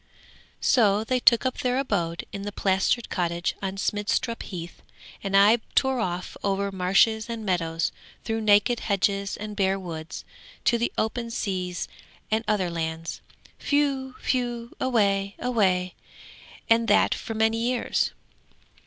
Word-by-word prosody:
'So 210 -4 +3
they 255 +3 0
took 240 0 +5
up 260 - -1
their 250 -2 +1
abode 175 -11 -1
in 200 - -4
the 205 +1 -4
plastered 195 +4 +1
cottage 170 -1 -1
on 195 0 -3
Smidstrup 210 +4 -1
Heath, 175 -3 -7 0.4
and 195 0 +2
I 205 +4 +7 0.2
tore 265 -2 +3
off 180 -4 -3
over 200 0 0
marshes 195 +4 +2
and 230 -2 -4
meadows, 165 -3 0 0.3
through 225 0 -2
naked 215 +3 +4
hedges 200 -1 0
and 210 0 -6
bare 195 -1 +2
woods, 165 -3 -7 0.4
to 235 - +3
the 235 - 0
open 230 +2 -1
seas 185 -6 -3 0.4
and 220 +1 +1
other 190 -5 +1
lands. 160 0 -4 0.5
Whew! 275 -3 +1
whew! 240 -2 -1
away, 200 -5 +1
away! 190 -7 +1 0.7
and 230 0 +4
that - - +4
for 225 - -5
many 220 +1 +2
years.' 240 +1 0
205 Hz, 135 wpm, -26 LUFS, 190-235 Hz, 0.7 s, I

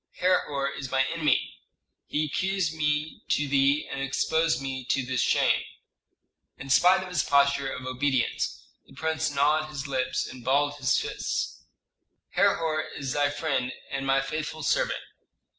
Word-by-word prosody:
Herhor 150 -6 +1
is 140 -2 -5
my 135 0 +2
enemy. 155 -5 0 0.5
He 150 +1 0
accused 185 +2 -1
me 150 0 -1
to 145 - +1
thee 140 +1 +2
and 135 - -5
exposed 160 +4 +1
me 135 -1 -4
to 130 +1 0
this 130 -1 0
shame!" - - +3 1.0
In 135 - -6
spite 185 +6 +5
of 185 - -8
his 180 - +1
posture 140 -1 +2
of 130 - -6
obedience 130 0 -1 0.2
the - - -17
prince 160 0 -1
gnawed 150 +2 +2
his 140 -2 -5
lips 130 -2 -1
and 125 -2 -10
balled 145 +3 +2
his 130 -3 +2
fists. - - -3 0.7
"Herhor 160 -2 +2 0.2
is 135 -2 -3
thy 145 -1 +2
friend 140 -4 -1 0.2
and 135 0 -3
my 135 0 +3
faithful 155 0 -4
servant. - - +1
145 Hz, 150 wpm, -27 LUFS, 135-155 Hz, 1.0 s, spite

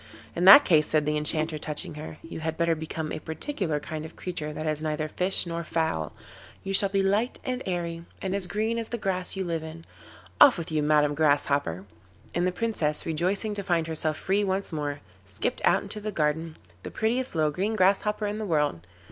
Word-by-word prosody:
'In 175 - 0
that 200 +10 +11
case,' 155 -3 +4
said 155 -1 +1
the 150 0 0
Enchanter, 155 +1 +1
touching 150 +1 -2
her, 155 +1 -8
'you 165 - -7
had 160 0 -3
better 170 0 +2
become 160 0 -4
a - - -3
particular 160 - -3
kind 155 0 -6
of 160 - -10
creature 155 -4 -4
that 155 +1 -5
is 155 -1 -1
neither 155 0 -2
fish 180 +5 0
nor 170 0 -4
fowl; 160 - -1 0.5
you 195 - -3
shall 195 0 +3
be 195 0 +1
light 210 +6 +1
and 255 0 -2
airy, 170 -2 -3 0.2
and 190 -1 -3
as 195 -2 -1
green 220 +4 -1
as 225 - -4
the 235 - -3
grass 185 -3 -2
you 195 - -2
live 165 -3 -2
in. 160 +1 -9 0.6
Off 270 - +9
with 165 -1 -5
you, 155 -1 +1
Madam 150 0 +3
Grasshopper.' 145 - +1 0.5
And 175 +1 +1
the - - +1
Princess, 180 -8 -1
rejoicing 185 +7 -1
to 205 - 0
find 175 -4 0
herself 155 -1 -1
free 200 +2 +1
once 195 0 -1
more, 145 -2 -3 0.3
skipped 95 - -3
out - - +3
into 215 - -4
the 210 0 -4
garden, 160 -1 -1 0.2
the - - -7
prettiest 240 +1 -1
little 155 -1 +2
green 200 +8 -1
Grasshopper 210 +2 +2
in 210 +1 -3
the 215 - -3
world. 150 - +1
165 Hz, 205 wpm, -27 LUFS, 155-195 Hz, 0.6 s, that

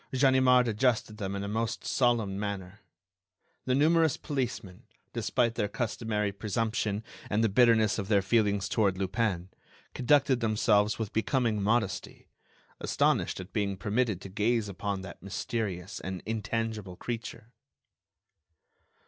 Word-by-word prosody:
Ganimard 130 -2 +4
adjusted 110 -1 +1
them 100 -2 -3
in 100 - -3
a - - -3
most 110 +2 -2
solemn 115 -6 +1
manner. 100 -1 -5 0.9
The 130 - +2
numerous 160 +1 +3
policemen, 120 - -4 0.3
despite 120 -2 +1
their 105 - -1
customary 105 -2 -2
presumption 105 +1 -2 0.3
and 105 +2 +1
the 110 - +3
bitterness 110 -1 +4
of 100 - -3
their 100 -2 +3
feelings 100 -2 +2
toward 100 -3 +1
Lupin, 95 -2 -1 0.4
conducted 135 0 +3
themselves 110 -2 +2
with 110 -3 -4
becoming 110 -2 +1
modesty, 110 -1 -1 0.5
astonished - - +1
at 95 +1 -9
being 100 -2 -1
permitted 105 -1 0
to 95 - -8
gaze 110 +2 +1
upon 100 0 -3
that 95 - -10
mysterious 100 -2 -4
and 95 -1 -6
intangible 110 -3 -3
creature. 115 +1 -6
110 Hz, 125 wpm, -29 LUFS, 100-120 Hz, 0.9 s, Ganimard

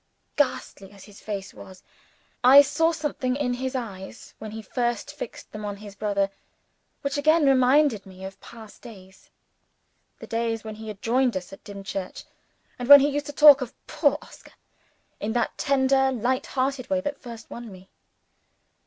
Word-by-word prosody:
Ghastly 200 -8 -2
as 200 - -14
his 205 -1 -15
face 200 -2 -6
was, 185 -1 -13 0.6
I 270 +3 +9
saw 295 +4 +1
something 295 -5 -2
in 270 -3 -1
his 260 +2 -4
eyes, 200 -7 -7
when 215 - -7
he 220 +1 -8
first 240 +5 -2
fixed 290 -6 -9
them 215 0 -8
on 205 -1 -5
his 205 0 -11
brother, 200 -1 -1 0.7
which 280 +1 -2
again 310 +1 +4
reminded 260 -4 +3
me 190 0 -11
of 195 0 -10
past 225 -3 -13
days 190 -5 -14 0.9
the - - -10
days 225 -1 -2
when 220 -1 -7
he 220 0 -9
had 210 -2 -9
joined 245 -1 +1
us 180 +1 -8
at - - -13
Dimchurch, 195 -2 -7 0.6
and 245 +1 -5
when 285 -1 +11
he 285 - +2
used 290 0 -3
to - - -5
talk 290 -1 +8
of 250 -2 -6
"poor 290 -2 +1
Oscar" - - -16 0.7
in 215 +2 -3
the 240 -1 +1
tender, 270 -1 +2
light 255 +1 -1
hearted 265 -1 -2
way 285 - +1
that 290 0 -5
first 235 -2 -11
won 235 -2 -8
me. 185 0 -15
240 Hz, 170 wpm, -25 LUFS, 205-275 Hz, 0.9 s, when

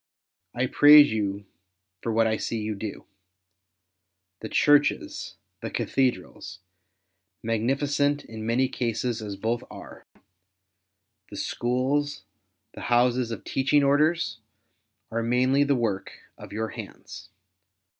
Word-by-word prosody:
I 125 +2 +1
praise 145 +1 +7
you 100 -2 -2 0.6
for 115 - -2
what 115 0 +3
I 110 0 +1
see 115 - -3
you 110 0 -3
do. 105 0 -7 1.3
The 110 - -7
Churches, 145 0 +2 0.3
the - - -4
Cathedrals 95 -7 -2 0.4
— 95 0 -53
magnificent 140 +6 0
in 110 -1 -8
many 120 +4 +1
cases 120 -2 -2
as 105 -2 -5
both 115 +4 -2
are - - -12 0.6
— 95 +1 -43
the - - -9
Schools, 130 +4 -1 0.5
the - - -10
Houses 120 0 +2
of 115 - -6
the - - -10
Teaching 140 +2 +2
Orders^ 145 -3 +2 0.7
are 115 +1 -1
mainly 130 +4 +2
the 140 -1 +2
work 105 -6 -2 0.2
of - - -12
your 110 +1 -3
hands. - - -10
120 Hz, 125 wpm, -26 LUFS, 110-135 Hz, 1.3 s, praise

